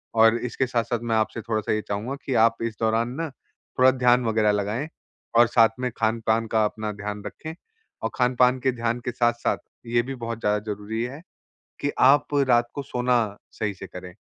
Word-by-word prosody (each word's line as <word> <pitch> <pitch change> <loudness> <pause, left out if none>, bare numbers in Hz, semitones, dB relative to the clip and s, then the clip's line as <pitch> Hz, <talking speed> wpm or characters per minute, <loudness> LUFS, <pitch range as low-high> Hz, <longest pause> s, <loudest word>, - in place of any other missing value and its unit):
और 115 +1 +6
इसके 125 +2 -1
साथ-साथ 120 -1 -1
मैं 115 -1 0
आपसे 110 +1 0
थोड़ा-सा 110 -2 -2
ये 110 - 0
चाहूँगा 110 +7 -3
कि 135 - -1
आप 115 0 +1
इस 115 -1 -3
दौरान 115 +1 +1
ना 165 - -2 0.5
थोड़ा 130 +1 +7
ध्यान 125 -1 +3
वग़ैरह 110 -2 +2
लगाएँ 105 +7 -1 0.5
और 120 0 +7
साथ 115 -1 +5
में 125 -1 -1
खान-पान 115 0 +1
का 110 -1 +3
अपना 105 0 -3
ध्यान 105 0 -6
रखें 160 0 -7 0.5
और - - 0
खान-पान 125 0 +3
के 130 +1 +1
ध्यान 120 -1 -2
के 125 - -1
साथ-साथ 120 0 +1 0.3
ये 120 0 +2
भी 135 +2 -5
बहुत 115 -1 -4
ज़्यादा 105 -1 +1
ज़रूरी 105 +2 -5
है 135 +5 -6 0.6
कि 145 - 0 0.2
आप 145 +1 +3
रात 120 -1 +4
को 140 - -3
सोना 125 -1 +1 0.4
सही 105 -2 -1
से 95 - -9
करें। 90 -1 -10
115 Hz, 190 wpm, -24 LUFS, 110-125 Hz, 0.6 s, थोड़ा